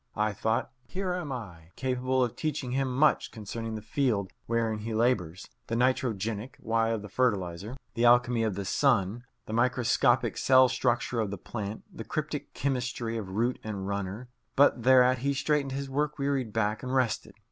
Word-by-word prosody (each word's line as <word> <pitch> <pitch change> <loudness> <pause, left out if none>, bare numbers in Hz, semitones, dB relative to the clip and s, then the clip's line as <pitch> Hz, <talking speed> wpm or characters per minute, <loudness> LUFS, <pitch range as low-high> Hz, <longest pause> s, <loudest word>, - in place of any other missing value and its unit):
I 105 -1 +1
thought: 110 +5 -1 0.2
Here 185 -1 -2
am 175 -5 -4
I, 90 -10 -7
capable 130 0 0
of 120 - -2
teaching 145 -5 -2
him 135 0 0
much 140 +4 +3
concerning 110 +1 -5
the 110 - -6
field 110 -5 0 0.2
wherein 115 -2 0
he 110 +1 -4
labours 100 -7 0 0.2
the 115 - -2
nitrogenic 115 -2 0
why 115 0 +1
of 115 -2 -2
the - - -7
fertilizer, 100 -1 -1 0.2
the 115 - +1
alchemy 120 0 +5
of 110 -4 0
the 100 0 -4
sun, 120 -1 +1 0.2
the 110 - -6
microscopic 120 +1 +2
cell 130 0 +6
structure 120 -1 0
of 110 -3 0
the 100 - -5
plant, 105 +2 -6
the - - -6
cryptic - - -4
chemistry 120 -4 -2
of 105 -4 -4
root 120 +4 +1
and 100 -3 -4
runner 100 +4 -4 0.3
but 135 -3 +5
thereat 130 0 +5
he 140 +2 0
straightened 145 -1 0
his 140 0 -3
work 150 +2 -1
wearied 140 -5 -1
back 105 0 0
and 130 0 -3
rested. 125 -4 0
120 Hz, 175 wpm, -29 LUFS, 110-130 Hz, 0.3 s, cell